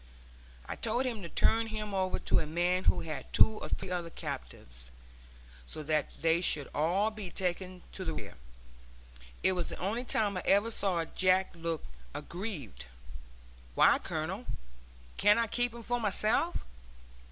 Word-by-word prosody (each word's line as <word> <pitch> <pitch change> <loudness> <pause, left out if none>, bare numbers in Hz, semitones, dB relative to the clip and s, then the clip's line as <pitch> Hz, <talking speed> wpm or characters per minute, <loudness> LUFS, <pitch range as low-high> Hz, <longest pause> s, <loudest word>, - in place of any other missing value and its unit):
I - - -4
told 235 +3 0
him 235 -5 -2
to 170 - -6
turn 225 +5 +3
him 215 -2 -4
over 190 -1 +1
to - - +2
a 155 - -2
man 175 +3 +1
who - - +4
had 155 -3 -6
two 220 -1 +5
or - - -5
three 180 - -3
other 175 -2 -2
captives, 60 - -7 0.8
so 155 - -6
that 155 0 +1
they 165 +1 +3
should 150 -5 +1
all 185 +8 +2
be 210 -4 -6
taken 180 0 -3
to 190 - -6
the 160 -3 -2
rear. - - -7 1.1
It 190 - +6
was 180 -2 -1
the - - -5
only 215 +7 -1
time 210 -5 0
I - - -1
ever 205 +4 +4
saw 185 -6 0
Jack 185 +2 +3
look 165 -2 -3 0.3
aggrieved. 150 - -5 0.9
"Why, - - +6
Colonel, - - -3 0.7
can't 205 +1 +6
I 230 - +3
keep 245 +2 0
him 235 0 -9
for 245 +2 0
myself?" 215 - +1
185 Hz, 160 wpm, -32 LUFS, 165-215 Hz, 1.1 s, It